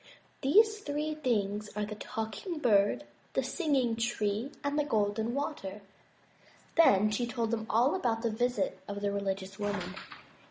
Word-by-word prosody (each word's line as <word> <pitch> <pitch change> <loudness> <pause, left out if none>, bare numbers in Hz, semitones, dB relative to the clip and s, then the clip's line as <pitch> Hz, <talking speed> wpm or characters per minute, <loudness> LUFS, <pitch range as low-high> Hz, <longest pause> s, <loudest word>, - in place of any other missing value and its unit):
These 430 +10 +5
three 300 -3 -2
things 210 -8 -1
are 210 0 -1
the 210 - -6
Talking 220 - -4
Bird, 205 -8 +3 0.3
the - - +1
Singing 275 -9 +1
Tree, 230 +1 -1
and 285 +1 0
the - - +3
Golden 220 -1 0
Water." 210 -9 -4 0.9
Then 215 - +6
she 240 +3 0
told 235 -2 -1
them 220 -1 -2
all 240 +6 +4
about 235 -10 0
the 230 - +1
visit 245 +5 0
of 200 0 -5
the 205 0 0
religious 195 -1 -3
woman. 205 0 -2
225 Hz, 150 wpm, -31 LUFS, 205-280 Hz, 0.9 s, Then